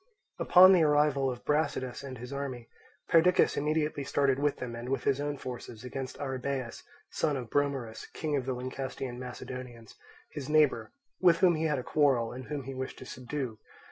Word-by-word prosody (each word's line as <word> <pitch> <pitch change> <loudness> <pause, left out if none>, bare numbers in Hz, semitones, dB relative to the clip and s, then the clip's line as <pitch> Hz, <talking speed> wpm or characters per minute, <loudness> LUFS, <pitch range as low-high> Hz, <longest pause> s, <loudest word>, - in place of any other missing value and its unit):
Upon 185 +1 +8
the 180 - +5
arrival 145 -3 +3
of 125 -1 -6
Brasidas 145 -4 -1
and 130 -2 -7
his 125 +3 -8
army, 130 -4 -5 0.4
Perdiccas 180 +1 +4
immediately 150 -1 0
started 140 -1 +1
with 145 0 +1
them 120 -2 -5
and 120 +2 -6
with 135 -2 -1
his 140 0 +1
own 145 0 -2
forces 120 -4 -8
against 130 +1 -6
Arrhabaeus, 130 -2 -3 0.3
son 150 -3 0
of 120 -4 -7
Bromerus, 135 -6 -1
king 155 -2 -2
of 135 -2 -2
the 130 - 0
Lyncestian 130 0 -5
Macedonians, 125 -2 -8 0.4
his 140 -2 -6
neighbour, 150 -7 +3 0.3
with 175 -2 +5
whom 180 -2 +6
he 160 0 -1
had 150 -2 +1
a 125 - -3
quarrel 130 -7 +2
and 130 +1 -8
whom 145 -1 -4
he 135 +1 -6
wished 130 0 -5
to - - -10
subdue. 125 -3 -5
135 Hz, 180 wpm, -30 LUFS, 125-150 Hz, 0.4 s, Upon